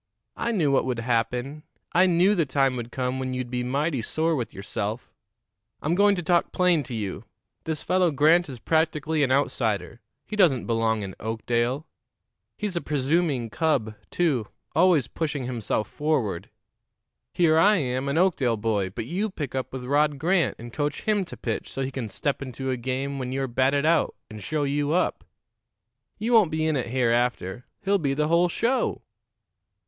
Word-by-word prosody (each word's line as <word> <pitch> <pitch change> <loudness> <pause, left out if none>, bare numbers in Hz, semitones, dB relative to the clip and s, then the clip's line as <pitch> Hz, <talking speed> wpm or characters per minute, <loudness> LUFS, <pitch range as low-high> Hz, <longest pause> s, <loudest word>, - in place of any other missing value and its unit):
I 235 - -1
knew 165 -10 +2
what 135 - +2
would 125 -2 -1
happen. 125 +5 -1 0.3
I 185 +2 +5
knew 180 +3 +4
the 175 -5 +2
time 135 -1 +2
would 120 -1 -5
come 130 0 -2
when 130 -1 -3
you'd 125 -1 -4
be 125 -1 -1
mighty 140 +2 0
sore 160 +7 0
with 125 -5 -3
yourself. 105 +4 -5 0.7
I'm 155 - -1
going 200 +2 +4
to 175 - -4
talk 170 +1 +2
plain 180 -3 +3
to 125 - -5
you. 105 -1 -4 0.4
This 160 -2 -3
fellow 185 -1 +3
Grant 155 +3 +4
is 130 - -7
practically 160 +1 0
an 135 -2 +2
outsider; 115 -6 0 0.2
he 215 - -5
doesn't 165 - +3
belong 115 -2 +1
in 95 -1 -6
Oakdale. 120 +5 -1 0.7
He's 210 -3 -3
a 170 - 0
presuming 145 -4 0
cub, 140 -7 0 0.2
too 140 -11 0 0.3
always 165 -7 +4
pushing 145 -4 -3
himself 115 -4 -2
forward. 125 - -1 0.8
Here 160 -2 +3
I 205 +5 +6
am, 130 -4 -1
an 140 - 0
Oakdale 145 -11 +2
boy, 105 -3 0
but 95 - -5
you 190 - -1
pick 150 -9 -5
up 130 -1 -3
with 130 -1 -6
Rod 145 +2 +2
Grant 170 +4 +1
and 120 +1 -10
coach 145 -1 -2
him 210 -3 +1
to - - -10
pitch - - -4
so 135 - -3
he 135 - -3
can 125 -4 -4
step 140 +7 -2
into 135 0 -4
a - - 0
game 130 +3 -3
when 130 -1 -4
you're 135 0 -1
batted 135 +4 +1
out 165 +1 +2 0.2
and 110 -1 -8
show 150 +8 -1
you 145 +1 0
up. 180 - 0 0.9
You 225 +3 -1
won't 215 -7 +6
be 155 0 -1
in 155 -1 +1
it 130 -4 -1
hereafter; 120 -3 0 0.2
he'll 200 0 +2
be 140 -4 0
the 150 +1 0
whole 170 +1 +4
show." 245 +9 0
140 Hz, 180 wpm, -25 LUFS, 120-165 Hz, 0.9 s, I